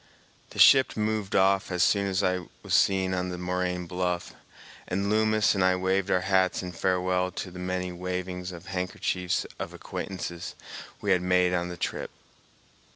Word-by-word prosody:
The - - -13
ship 135 -3 +6
moved 105 -2 -1
off 95 0 +3
as 90 -2 +1
soon 100 +2 +3
as 95 +1 0
I 90 -2 0 0.2
was - - -4
seen 95 -1 +3
on 90 0 -1
the 90 - -4
moraine 90 0 -2
bluff, 90 0 -2 0.5
and 100 +2 -1
Loomis 110 0 +3
and 95 -2 +1
I 95 0 +4
waved 95 +1 0
our 90 - +2
hats 95 -1 +2
in 90 - -5
farewell 90 +1 0
to 90 - -5
the 90 - -9
many 90 0 -2
wavings 90 0 -4
of 85 -2 -10
handkerchiefs 90 -1 -2
of - - -5
acquaintances 85 -3 -6 0.5
we 100 - 0
had 90 -2 +4
made 90 0 +3
on 90 0 -1
the 90 - -7
trip. - - -3
90 Hz, 170 wpm, -27 LUFS, 90-95 Hz, 0.5 s, ship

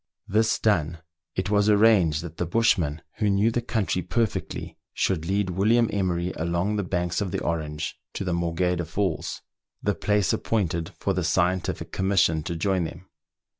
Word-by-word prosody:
This 110 +2 +2
done, 85 -6 +1 0.4
it 95 +2 -2
was 105 0 +3
arranged 100 -8 +4
that 85 -2 -8
the 90 - -1
bushman, 85 -7 +1
who 105 - +1
knew 100 +3 +3
the 120 - 0
country 110 -6 -1
perfectly, 110 +4 -2 0.2
should 80 -4 0
lead 100 0 0
William 110 +6 +3
Emery 90 -3 0
along 85 +5 0
the 100 - 0
banks 90 0 -1
of 100 - -1
the - - -2
Orange 75 -2 -3
to - - -3
the 90 -2 -1
Morgheda 85 +1 0
Falls, 85 +1 -2 0.4
the 105 - +2
place 105 -4 +1
appointed 85 -7 -1
for - - 0
the - - -1
scientific 90 0 0
commission 95 -5 +2
to 85 +2 -4
join 90 +1 0
them. 85 +3 -9
90 Hz, 165 wpm, -25 LUFS, 85-105 Hz, 0.4 s, arranged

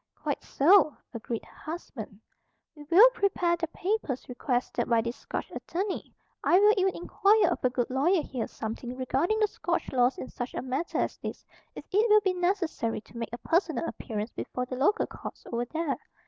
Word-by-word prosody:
"Quite - - -3
so," 310 +1 +5 0.2
agreed 230 0 -4
her - - -19
husband. 255 - -7 0.6
"We 295 - -11
will 405 +9 +9
prepare 365 -6 +1
the 335 -1 -3
papers 350 - -2
requested 250 0 -1
by 230 -1 +4
this 235 +2 -4
Scotch - - -5
attorney. 380 +3 -4 0.3
I 360 - +5
will 420 +1 +6
even 380 -2 +1
inquire 415 +4 +3
of - - -3
a 255 - +4
good 245 -1 -1
lawyer 310 +6 +2
here 250 -4 -4
something 235 +3 -6
regarding 270 - +1
the 430 -1 +3
Scotch 345 -3 -2
laws 250 0 +3
in - - -5
such 245 0 -5
a - - -2
matter 265 +6 -2
as - - -1
this, - - -6 0.3
if - - -8
it 425 +4 +3
will 425 0 +7
be 380 -2 +1
necessary 350 - -1
to 235 - -14
make 230 - -3
a 240 - -5
personal 330 - 0
appearance 215 -1 -4
before 250 - -4
the 255 - -5
local 300 - +2
courts - - -9
over 235 +1 -1
there. 315 +2 -2
305 Hz, 190 wpm, -28 LUFS, 245-370 Hz, 0.6 s, will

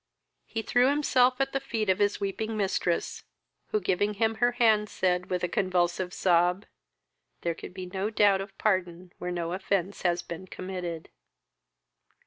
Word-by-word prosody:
He 225 - -3
threw 245 +3 +3
himself 260 -3 +3
at 270 0 +1
the 275 - +1
feet 230 -5 -2
of 190 -1 +2
his 205 0 +2
weeping 215 +3 -3
mistress, 190 -4 -1 0.4
who, 215 - 0
giving 205 +2 0
him 225 +2 +1
her 240 0 +4
hand, 220 -3 +3
said, 180 -1 0
with 180 -1 -1
a - - +2
convulsive 180 -2 0
sob, 180 +1 +2 0.8
"There 170 - 0
could 180 - -10
be 185 - -5
no 190 +3 -2
doubt 205 -3 +4
of 195 0 -9
pardon 180 -3 -1
where 180 - -4
no 170 -1 -2
offence 195 0 -1
had 175 -1 +1
been 170 +2 -7
committed." 180 -3 -6
190 Hz, 160 wpm, -28 LUFS, 180-215 Hz, 0.8 s, her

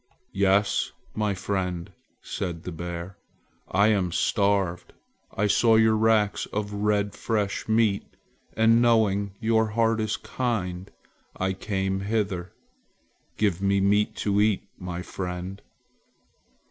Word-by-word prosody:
"Yes, 100 +1 +2 0.2
my 105 -2 0
friend," 90 -3 -3 0.3
said 85 -3 -4
the 90 - -5
bear. 85 +2 -6 0.5
"I 100 +3 +4
am 95 -5 +1
starved. 100 -2 0 0.4
I 105 - -1
saw 110 +2 +4
your 110 0 +5
racks 110 -2 +2
of 105 0 -4
red 105 0 0
fresh 105 -3 -2
meat, 110 -3 +2 0.5
and 115 +1 +5
knowing 100 -4 +2
your 110 0 +2
heart 115 -1 +3
is 110 -1 -1
kind, 95 -7 -3 0.5
I 95 0 0
came 95 0 -2
hither. 100 -3 -2 0.9
Give 100 -4 +1
me 100 0 +2
meat 105 +2 +2
to 100 0 +3
eat, 105 -2 +2 0.2
my 90 -1 -5
friend." 90 +1 -5
100 Hz, 120 wpm, -26 LUFS, 95-110 Hz, 0.9 s, your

